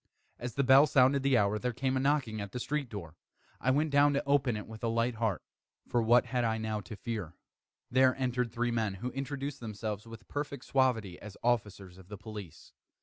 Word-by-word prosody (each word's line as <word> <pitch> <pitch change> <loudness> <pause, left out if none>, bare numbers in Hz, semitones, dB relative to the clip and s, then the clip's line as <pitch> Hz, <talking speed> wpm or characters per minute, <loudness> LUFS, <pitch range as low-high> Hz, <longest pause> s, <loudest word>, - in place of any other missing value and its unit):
As 120 -1 -5
the 140 - +2
bell 135 +3 +7
sounded 135 0 +4
the 135 -2 +3
hour, 105 +1 +2
there 125 +1 -2
came 130 +2 -1
a - - +2
knocking 130 -6 0
at 100 -1 -7
the 125 - -3
street 145 0 -2
door. 85 -7 -8 0.4
I 130 - 0
went 150 +3 +2
down 145 +1 +5
to 140 - -1
open 135 -5 +2
it 105 - -6
with 110 +1 -11
a - - +1
light 115 +2 +1
heart, 110 -4 -1 0.4
for 120 - +1
what 120 +2 +5
had 125 -2 -1
I 110 -1 +1
now 110 -1 -2
to 95 +3 -9
fear? 105 -7 -5 0.6
There 130 0 +4
entered 125 -2 -1
three 120 +1 -1
men, 110 -4 -1
who 125 +7 -4
introduced 140 +1 -4
themselves, 105 -1 -5
with 115 -2 -11
perfect 145 -1 -5
suavity, 115 -9 +1
as 105 -1 -10
officers 100 -6 -1
of 95 - -15
the 105 +1 -8
police. 105 -6 -10
120 Hz, 210 wpm, -31 LUFS, 105-130 Hz, 0.6 s, bell